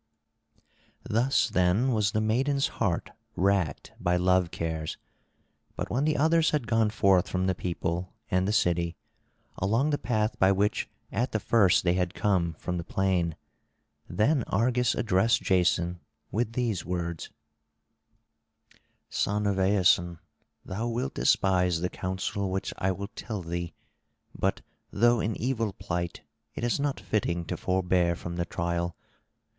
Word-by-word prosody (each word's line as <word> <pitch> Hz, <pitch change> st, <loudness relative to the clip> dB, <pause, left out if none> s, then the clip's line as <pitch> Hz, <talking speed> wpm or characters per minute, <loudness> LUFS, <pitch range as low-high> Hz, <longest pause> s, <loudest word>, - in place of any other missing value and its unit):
Thus 120 Hz, +6 st, +2 dB
then 90 Hz, +9 st, +2 dB
was 105 Hz, -4 st, +1 dB
the 110 Hz, -, 0 dB
maiden's 135 Hz, +6 st, +1 dB
heart 90 Hz, -7 st, 0 dB, 0.2 s
racked 95 Hz, -5 st, 0 dB
by 90 Hz, 0 st, +1 dB
love 90 Hz, -1 st, +3 dB
cares. 80 Hz, -2 st, -4 dB, 0.8 s
But -, -, -4 dB
when 130 Hz, +7 st, +1 dB
the 155 Hz, -, +1 dB
others 160 Hz, +2 st, +4 dB
had 150 Hz, -5 st, 0 dB
gone 110 Hz, -1 st, +2 dB
forth 95 Hz, -4 st, +3 dB
from 95 Hz, 0 st, 0 dB
the 95 Hz, -, +2 dB
people 90 Hz, 0 st, -3 dB, 0.2 s
and 90 Hz, +1 st, +2 dB
the -, -, +1 dB
city, 85 Hz, -4 st, +1 dB, 0.6 s
along 115 Hz, +10 st, +1 dB
the 145 Hz, -, 0 dB
path 110 Hz, -3 st, -1 dB
by 95 Hz, +1 st, +5 dB
which 100 Hz, +2 st, 0 dB, 0.2 s
at 125 Hz, +3 st, -1 dB
the 110 Hz, -, +1 dB
first 100 Hz, -4 st, +4 dB
they 85 Hz, -1 st, +3 dB
had 90 Hz, -1 st, -1 dB
come 90 Hz, -5 st, +1 dB
from 90 Hz, +3 st, -4 dB
the -, -, -4 dB
plain, 90 Hz, -3 st, 0 dB, 0.7 s
then 140 Hz, +6 st, +2 dB
Argus 120 Hz, +3 st, +1 dB
addressed 105 Hz, +1 st, +2 dB
Jason 90 Hz, -1 st, +2 dB, 0.3 s
with 115 Hz, +1 st, -1 dB
these 115 Hz, -6 st, -1 dB
words: 85 Hz, -2 st, -4 dB, 1.8 s
"Son 105 Hz, +1 st, -1 dB
of 100 Hz, -1 st, +1 dB
Aeson, 90 Hz, -3 st, +3 dB, 0.5 s
thou 110 Hz, +6 st, -3 dB
wilt 125 Hz, +5 st, -2 dB
despise 90 Hz, -3 st, +2 dB
the 90 Hz, -, 0 dB
counsel 95 Hz, +1 st, -3 dB
which 95 Hz, +1 st, -3 dB
I 95 Hz, -, +1 dB
will 100 Hz, +2 st, -5 dB
tell 110 Hz, -4 st, -6 dB
thee, 85 Hz, -1 st, -4 dB, 0.6 s
but, -, -, -1 dB, 0.3 s
though 120 Hz, +2 st, +3 dB
in 110 Hz, 0 st, -1 dB
evil 115 Hz, -4 st, -1 dB
plight, 85 Hz, -2 st, -4 dB, 0.3 s
it -, -, -5 dB
is 120 Hz, +2 st, +1 dB
not 140 Hz, -1 st, -1 dB
fitting 85 Hz, -5 st, -1 dB
to -, -, -3 dB
forbear 90 Hz, -2 st, +1 dB
from 85 Hz, 0 st, -6 dB
the 85 Hz, -, 0 dB
trial. 85 Hz, 0 st, -2 dB
95 Hz, 145 wpm, -28 LUFS, 90-115 Hz, 1.8 s, by